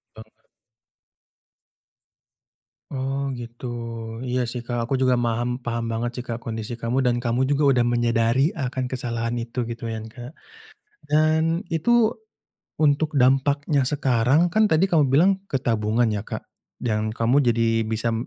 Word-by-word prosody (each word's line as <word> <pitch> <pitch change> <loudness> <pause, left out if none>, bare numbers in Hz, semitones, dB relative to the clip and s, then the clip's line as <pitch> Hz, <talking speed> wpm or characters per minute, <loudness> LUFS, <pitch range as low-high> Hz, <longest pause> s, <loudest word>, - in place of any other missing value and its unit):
Banget. 110 0 -15 2.5
Oh 135 +1 -2
gitu. 120 +1 -9 0.6
Iya 125 0 0
sih 120 -1 -5
Kak. 120 -1 -2
Aku 135 - +1
juga 130 -1 +3
maham 120 +1 -1
paham 115 -1 -3
banget 120 +2 -2
sih 125 - -4
Kak 115 0 -4
kondisi 110 0 -5
kamu 125 +3 0
dan 120 -1 +1
kamu 120 +2 +1
juga 145 +2 +1
udah 120 - +3
menyadari 120 +3 +2
akan 130 -2 -2
kesalahan 120 -2 -3
itu 115 +1 -3
gitu 115 0 -6
kan 110 0 -6
Kak, 120 +4 -10 0.8
dan 160 +4 +2
itu 225 +7 +2 0.6
untuk 155 0 +2
dampaknya 140 +3 +2
sekarang, 135 +3 +2
kan 215 -1 +4
tadi 160 +5 +4
kamu 150 -7 +2
bilang 165 +8 +5 0.2
ke 135 - +1
tabungan 115 -1 +1
ya 100 - -3
Kak - - -6 0.3
dan 110 -2 -1
kamu 120 +5 +2
jadi 115 -2 +2
bisa 115 +1 -1
m 115 +2 -3
125 Hz, 145 wpm, -23 LUFS, 115-140 Hz, 2.5 s, bilang